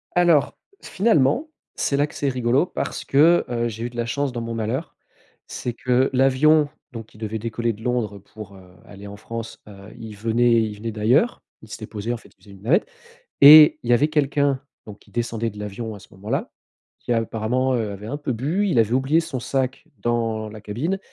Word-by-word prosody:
Alors, 175 Hz, -5 st, +3 dB, 0.2 s
finalement, 215 Hz, -, +1 dB, 0.3 s
c'est 140 Hz, -, 0 dB
là 145 Hz, +1 st, +2 dB
que -, -, -15 dB
c'est 140 Hz, -, -1 dB
rigolo, 125 Hz, +3 st, +1 dB
parce -, -, -5 dB
que, 160 Hz, +5 st, +4 dB
heu, 120 Hz, -1 st, -1 dB
j'ai 115 Hz, 0 st, -6 dB
eu -, -, -3 dB
de 120 Hz, -, -17 dB
la 120 Hz, -, -1 dB
chance 140 Hz, +3 st, -2 dB
dans 120 Hz, -1 st, -5 dB
mon 115 Hz, 0 st, -5 dB
malheur. 110 Hz, -1 st, -3 dB, 0.5 s
C'est 120 Hz, -, -5 dB
que 125 Hz, +2 st, +1 dB
l'avion, 145 Hz, +4 st, +4 dB, 0.2 s
donc, 115 Hz, -3 st, -10 dB
il 110 Hz, -, -17 dB
devait 110 Hz, 0 st, -4 dB
décoller 115 Hz, +1 st, -2 dB
de 110 Hz, +2 st, -13 dB
Londres 120 Hz, -5 st, -1 dB
pour, 100 Hz, 0 st, -12 dB
heu, 90 Hz, -1 st, -17 dB
aller 100 Hz, 0 st, -11 dB
en 100 Hz, 0 st, -9 dB
France, 115 Hz, +2 st, -7 dB
heu, 100 Hz, 0 st, -13 dB
il 110 Hz, -2 st, -9 dB
venait 115 Hz, +2 st, +2 dB
il 105 Hz, -1 st, -4 dB
venait 115 Hz, +2 st, -5 dB
d'ailleurs. 120 Hz, -, +1 dB, 0.2 s
Il 110 Hz, -, -15 dB
s'était 110 Hz, 0 st, -8 dB
posé, 110 Hz, +2 st, -5 dB
en -, -, -4 dB
fait, -, -, -18 dB
il -, -, -37 dB
faisait 100 Hz, -2 st, -14 dB
une 95 Hz, -, -17 dB
navette 165 Hz, -, +2 dB, 0.5 s
et 150 Hz, +1 st, +10 dB
il 120 Hz, -, -6 dB
y -, -, +6 dB
avait 140 Hz, +5 st, +3 dB
quelqu'un, 145 Hz, -2 st, +1 dB, 0.2 s
donc, 105 Hz, -1 st, -11 dB
qui -, -, -23 dB
descendait 115 Hz, -1 st, -2 dB
de 105 Hz, -, -12 dB
l'avion 105 Hz, +2 st, -6 dB
à -, -, -11 dB
ce 100 Hz, -, -17 dB
moment-là, 100 Hz, +2 st, -4 dB, 0.5 s
qui, 120 Hz, -, -2 dB
apparemment, 115 Hz, +3 st, 0 dB
heu, 110 Hz, -4 st, -2 dB
avait 100 Hz, +2 st, -8 dB
un 145 Hz, -, -4 dB
peu 145 Hz, -3 st, -4 dB
bu, 155 Hz, -, -1 dB
il 170 Hz, -11 st, +2 dB
avait 115 Hz, +1 st, +2 dB
oublié 135 Hz, +5 st, +2 dB
son 160 Hz, -6 st, -5 dB
sac 130 Hz, +1 st, -2 dB
dans 115 Hz, -2 st, -1 dB
la 105 Hz, 0 st, -11 dB
cabine 135 Hz, -, -3 dB
120 Hz, 215 wpm, -22 LUFS, 110-140 Hz, 0.5 s, et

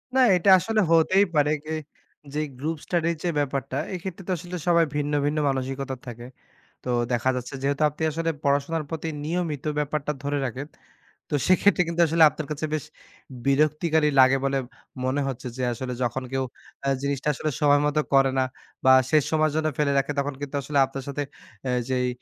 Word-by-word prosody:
না -, -, +4 dB, 0.2 s
এটা 180 Hz, +3 st, +2 dB
আসলে 220 Hz, +3 st, 0 dB
হতেই 185 Hz, +5 st, +5 dB
পারে 150 Hz, 0 st, +3 dB
গে 160 Hz, -, -6 dB, 0.6 s
যে 150 Hz, -, -1 dB, 0.2 s
গ্রুপ 160 Hz, +2 st, -2 dB
স্টাডির 170 Hz, -1 st, 0 dB
যে 175 Hz, -, +1 dB
ব্যাপারটা 135 Hz, -1 st, -2 dB, 0.2 s
এক্ষেত্রে 185 Hz, +1 st, -6 dB
তো -, -, -1 dB
আসলে 175 Hz, +2 st, -6 dB
সবাই 170 Hz, -1 st, +5 dB
ভিন্ন, 145 Hz, 0 st, -1 dB
ভিন্ন, 150 Hz, +1 st, 0 dB
মানসিকতা 135 Hz, 0 st, -3 dB
থাকে। 120 Hz, 0 st, -8 dB, 0.6 s
তো 125 Hz, -, -2 dB, 0.2 s
দেখা 120 Hz, +2 st, +2 dB
যাচ্ছে 125 Hz, +3 st, -6 dB
যেহেতু 140 Hz, +2 st, 0 dB
আপনি 150 Hz, +2 st, -8 dB
আসলে 165 Hz, +2 st, -1 dB
পড়াশোনার 145 Hz, +3 st, +1 dB
প্রতি 160 Hz, 0 st, -4 dB, 0.2 s
নিয়মিত 160 Hz, -3 st, -2 dB
ব্যাপারটা 150 Hz, 0 st, -1 dB
ধরে 145 Hz, 0 st, -1 dB
রাখেন। 130 Hz, +4 st, -5 dB, 0.6 s
তো -, -, -6 dB
সেক্ষেত্রে 185 Hz, 0 st, +4 dB
কিন্তু 170 Hz, 0 st, 0 dB
আসলে 165 Hz, +1 st, +4 dB
আপনার 150 Hz, +1 st, -7 dB
কাছে 150 Hz, +1 st, -2 dB
বেশ 155 Hz, -, -1 dB, 0.6 s
বিরক্তিকারী 155 Hz, +2 st, +2 dB
লাগে 130 Hz, +1 st, +6 dB
বলে 135 Hz, 0 st, +1 dB, 0.5 s
মনে 135 Hz, +3 st, 0 dB
হচ্ছে। 130 Hz, -1 st, -5 dB
যে 130 Hz, -, -2 dB
আসলে 125 Hz, +2 st, -5 dB
যখন 125 Hz, +2 st, -2 dB
কেউ 135 Hz, 0 st, 0 dB, 0.4 s
আ -, -, 0 dB
জিনিসটা 140 Hz, 0 st, -2 dB
আসলে 155 Hz, -, -2 dB
সময় 145 Hz, -1 st, +5 dB
মত 150 Hz, +1 st, 0 dB, 0.2 s
করে 135 Hz, -1 st, +5 dB
না -, -, +3 dB, 0.4 s
বা 130 Hz, -, +8 dB, 0.2 s
শেষ 155 Hz, -3 st, +4 dB
সময়ের 155 Hz, -1 st, +2 dB
জন্য 155 Hz, 0 st, +1 dB
ফেলে 145 Hz, -2 st, +2 dB
রাখে 140 Hz, +1 st, +1 dB
তখন 140 Hz, 0 st, -1 dB
কিন্তু 145 Hz, 0 st, -5 dB
আসলে 140 Hz, +1 st, -2 dB
আপনার 135 Hz, 0 st, -7 dB
সাথে 145 Hz, +1 st, -2 dB, 0.5 s
আ -, -, +1 dB, 0.2 s
যেই 125 Hz, -1 st, +1 dB
145 Hz, 180 wpm, -25 LUFS, 135-160 Hz, 0.6 s, বা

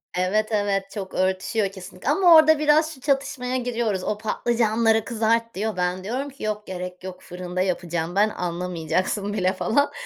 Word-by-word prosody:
Evet, 195 Hz, +4 st, +1 dB
evet, 205 Hz, -2 st, +1 dB
çok 195 Hz, -2 st, -6 dB
örtüşüyor 190 Hz, +2 st, 0 dB
kesinlikle 190 Hz, +7 st, -7 dB
ama 345 Hz, +1 st, +6 dB
orada 315 Hz, -1 st, +7 dB
biraz 305 Hz, +1 st, +3 dB
şu 260 Hz, -, -16 dB
çatışmaya 265 Hz, -2 st, -1 dB
giriyoruz. 235 Hz, -6 st, -1 dB
O, 210 Hz, -, -1 dB
patlıcanları 225 Hz, 0 st, +1 dB
kızart 230 Hz, 0 st, 0 dB
diyor. 215 Hz, +1 st, -2 dB
Ben 180 Hz, +1 st, -1 dB
diyorum 255 Hz, +8 st, -3 dB
ki, 275 Hz, -, -12 dB
“Yok, 210 Hz, 0 st, -3 dB
gerek 180 Hz, 0 st, -6 dB
yok, 185 Hz, -1 st, -8 dB
fırında 180 Hz, 0 st, -5 dB
yapacağım 175 Hz, -2 st, -2 dB
ben, 210 Hz, +2 st, +4 dB
anlamayacaksın 180 Hz, +3 st, -2 dB
bile.” 185 Hz, -2 st, +1 dB
falan 285 Hz, +8 st, +1 dB
210 Hz, 160 wpm, -24 LUFS, 185-240 Hz, -, orada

